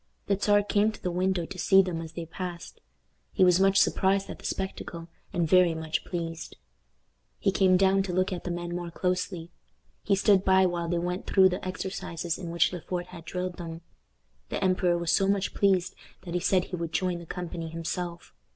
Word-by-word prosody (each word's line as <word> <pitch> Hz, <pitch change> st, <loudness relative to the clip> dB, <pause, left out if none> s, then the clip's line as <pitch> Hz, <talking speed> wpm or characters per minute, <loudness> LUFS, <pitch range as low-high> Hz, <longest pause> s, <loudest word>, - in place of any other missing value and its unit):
The 200 Hz, -, +2 dB
Czar 205 Hz, +1 st, +3 dB
came 205 Hz, +1 st, +2 dB
to 215 Hz, -, -12 dB
the 180 Hz, -, -1 dB
window 180 Hz, 0 st, 0 dB
to 185 Hz, +1 st, -9 dB
see 195 Hz, +2 st, +5 dB
them 175 Hz, -3 st, -3 dB
as 160 Hz, -1 st, -8 dB
they 170 Hz, 0 st, -5 dB
passed. 175 Hz, +1 st, -7 dB, 0.5 s
He -, -, +3 dB
was 180 Hz, 0 st, +5 dB
much 195 Hz, 0 st, +4 dB
surprised 195 Hz, +1 st, +2 dB
at -, -, -9 dB
the -, -, -13 dB
spectacle, 175 Hz, -3 st, -4 dB, 0.2 s
and 175 Hz, -3 st, 0 dB
very 180 Hz, 0 st, +5 dB
much 160 Hz, 0 st, -3 dB
pleased. 165 Hz, -2 st, -5 dB, 0.8 s
He 195 Hz, -, +1 dB
came 185 Hz, -1 st, +4 dB
down 195 Hz, +1 st, +4 dB
to 190 Hz, -1 st, -3 dB
look 185 Hz, +1 st, +1 dB
at 175 Hz, -, -5 dB
the -, -, -4 dB
men 175 Hz, 0 st, -4 dB
more 175 Hz, -1 st, -4 dB
closely; 180 Hz, -1 st, -2 dB, 0.5 s
he 200 Hz, -, +2 dB
stood 195 Hz, -1 st, +4 dB
by 190 Hz, 0 st, +5 dB
while 175 Hz, -2 st, -1 dB
they 175 Hz, -, 0 dB
went 180 Hz, +2 st, -3 dB
through 190 Hz, -1 st, +5 dB
the 180 Hz, -, -4 dB
exercises 180 Hz, -2 st, -4 dB
in 175 Hz, -3 st, -6 dB
which 170 Hz, +2 st, +2 dB
Le 175 Hz, -, -5 dB
Fort 175 Hz, +1 st, -4 dB
had 170 Hz, -2 st, -11 dB
drilled 180 Hz, 0 st, -4 dB
them. 165 Hz, -1 st, -7 dB, 0.7 s
The -, -, -2 dB
emperor 185 Hz, -2 st, +2 dB
was 170 Hz, -1 st, -1 dB
so 195 Hz, -, +3 dB
much 200 Hz, 0 st, 0 dB
pleased 190 Hz, -3 st, +2 dB, 0.3 s
that 175 Hz, -2 st, -7 dB
he 180 Hz, -, +1 dB
said 185 Hz, 0 st, +2 dB
he 180 Hz, -, -6 dB
would 170 Hz, -2 st, -5 dB
join 180 Hz, -2 st, 0 dB
the 170 Hz, -, -11 dB
company 170 Hz, -2 st, -5 dB
himself. 170 Hz, +1 st, -5 dB
180 Hz, 205 wpm, -28 LUFS, 170-190 Hz, 0.8 s, see